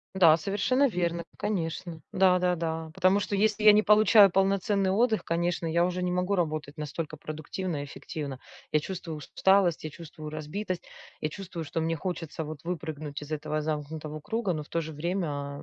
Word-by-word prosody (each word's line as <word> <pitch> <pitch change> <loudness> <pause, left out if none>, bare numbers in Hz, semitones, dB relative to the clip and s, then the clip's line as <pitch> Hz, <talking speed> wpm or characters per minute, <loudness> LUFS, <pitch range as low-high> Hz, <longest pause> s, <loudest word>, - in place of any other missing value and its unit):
Да, 170 -4 +7
совершенно 250 - +2
верно, 170 -4 -1
конечно. 170 -4 -3
Да-да-да. 180 -4 +2
Потому 185 +4 +3
что 200 +1 -1
если 215 +1 +2
я 210 - +10
не 210 +1 +5
получаю 210 -1 +7
полноценный 195 +1 +2
отдых, 220 +2 +2
конечно, 170 0 -1
я 170 +1 +2
уже 180 0 -1
не 180 - 0
могу 180 +2 0
работать 155 -5 -2
настолько 150 +1 -4
продуктивно 155 +1 -4
и - - -4
эффективно. 140 -2 -6 0.3
Я 155 - +4
чувствую 170 -1 -5
усталость, 185 +2 +2
я 155 - -3
чувствую 155 -1 -9
разбитость, 170 +5 -4 0.4
я 155 - 0
чувствую, 170 -1 -6
что 160 +2 -3
мне 165 +1 0
хочется 165 -1 -4
вот 155 -1 -7
выпрыгнуть 155 -4 -4
из 150 - -9
этого 155 0 -2
замкнутого 155 0 -4
круга, 205 +3 -1
но 155 - -3
в 150 - -15
то 165 - -1
же 160 -1 -6
время 150 -4 -3
170 Hz, 175 wpm, -28 LUFS, 155-190 Hz, 0.4 s, я